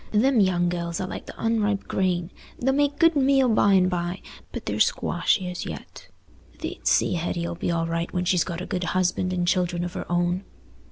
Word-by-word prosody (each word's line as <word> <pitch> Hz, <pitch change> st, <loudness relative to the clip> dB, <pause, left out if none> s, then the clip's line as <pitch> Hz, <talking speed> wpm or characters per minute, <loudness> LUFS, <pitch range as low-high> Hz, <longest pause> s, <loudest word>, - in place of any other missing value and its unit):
Them 245 Hz, +4 st, +3 dB
young 180 Hz, -3 st, +3 dB
gells 170 Hz, -1 st, -2 dB
are 185 Hz, -, -2 dB
like -, -, -7 dB
the -, -, -9 dB
unripe 215 Hz, -3 st, 0 dB
grain; 180 Hz, -2 st, 0 dB, 0.3 s
they'll 265 Hz, +2 st, +1 dB
make 285 Hz, +1 st, +1 dB
good 330 Hz, 0 st, +4 dB
meal 270 Hz, -1 st, +4 dB
by 210 Hz, -3 st, +4 dB
and 185 Hz, -1 st, +5 dB
by, 175 Hz, 0 st, -3 dB, 0.3 s
but -, -, -6 dB
they're -, -, -2 dB
squashy 185 Hz, -, +1 dB
as 180 Hz, -1 st, -4 dB
yet. -, -, -9 dB, 0.5 s
Thee't -, -, -6 dB
see -, -, +3 dB
Hetty 170 Hz, 0 st, -2 dB
'll 170 Hz, -, -3 dB
be 170 Hz, -, -3 dB
all 165 Hz, -1 st, 0 dB
right 165 Hz, +1 st, -2 dB
when 180 Hz, 0 st, -1 dB
she's 180 Hz, -1 st, +3 dB
got 170 Hz, -1 st, -5 dB
a -, -, -4 dB
good 185 Hz, -2 st, -3 dB
husband 185 Hz, 0 st, +1 dB
and 175 Hz, -1 st, -1 dB
children 175 Hz, -1 st, +1 dB
of 175 Hz, 0 st, -4 dB
her 190 Hz, -, -6 dB
own." 175 Hz, +2 st, +1 dB
180 Hz, 210 wpm, -25 LUFS, 175-205 Hz, 0.5 s, and